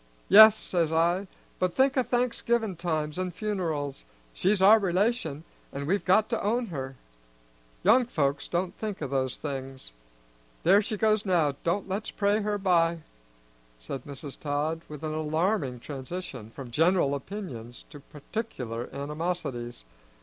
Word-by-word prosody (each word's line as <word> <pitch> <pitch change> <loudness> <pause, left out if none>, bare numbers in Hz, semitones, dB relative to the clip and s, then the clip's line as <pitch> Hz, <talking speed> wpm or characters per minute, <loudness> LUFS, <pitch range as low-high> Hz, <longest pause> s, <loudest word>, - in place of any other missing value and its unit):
'Yes,' 220 +2 +10
says 170 -6 0
I, 170 +4 +2 0.3
'but 185 -1 0
think 265 0 +3
o' 260 - +4
Thanksgivin' 235 -3 0
times 155 -2 -2
an' 185 0 -1
funerals; 170 -8 -3 0.3
she's 195 +2 +1
our 205 +4 +7
relation, 185 -5 0 0.3
an' 140 +1 -5
we've 190 +4 0
got 200 +4 +4
to 230 - 0
own 235 +4 0
her.' 135 -2 -5 0.9
Young 250 -1 +5
folks 140 - -1
don't 175 +1 -2
think 210 -3 -4
o' - - -1
those 130 -1 -1
things. 135 - -6 0.7
There 195 +4 +6
she 215 0 -3
goes 215 0 +2
now, 170 -7 +2
do 170 +4 0
let's 195 +3 -3
pray 205 +1 +1
her 210 0 -1
by!" 170 -4 +2 0.8
said 90 - -6
Mrs. 140 0 -9
Todd, 150 +2 -1
with 150 0 -9
an 155 -1 -2
alarming 155 - 0
transition 135 -4 -7
from 125 +1 -9
general 165 +1 +3
opinions 135 - -7
to 145 - -10
particular 140 - -6
animosities. 140 - -4
170 Hz, 140 wpm, -28 LUFS, 140-205 Hz, 0.9 s, Yes